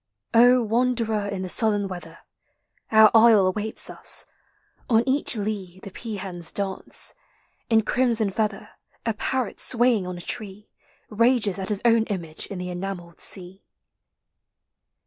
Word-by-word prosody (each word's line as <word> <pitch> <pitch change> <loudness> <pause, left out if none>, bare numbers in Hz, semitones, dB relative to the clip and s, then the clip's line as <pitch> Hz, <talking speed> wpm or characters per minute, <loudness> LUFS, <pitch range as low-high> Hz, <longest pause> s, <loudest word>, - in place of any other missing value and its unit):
wanderer 235 -2 +3
in 195 -2 -4
the - - -4
southern 205 -1 +2
weather, 180 -2 -9 0.7
Our 220 -1 +7
isle 225 -3 +6
awaits 210 +4 -3
us; - - -2 0.6
on 225 -1 +4
each 270 -1 +2
lea 200 -4 -4
The 200 - -8
peahens 185 -6 -5
dance; 195 -2 -2 0.6
in 225 -1 +4
crimson 230 -4 +1
feather 210 0 -2 0.4
A 225 - 0
parrot 255 +2 -2
swaying 240 -6 +2
on 180 -1 -5
a - - -7
tree 210 +1 -6 0.4
Rages 225 -3 +2
at 190 - 0
his 210 -1 -1
own 230 -1 +4
image 170 -7 -4
in 200 - -7
the 180 0 -5
enamelled 175 -2 -6
sea. 190 +1 -1
210 Hz, 130 wpm, -24 LUFS, 190-230 Hz, 0.7 s, Our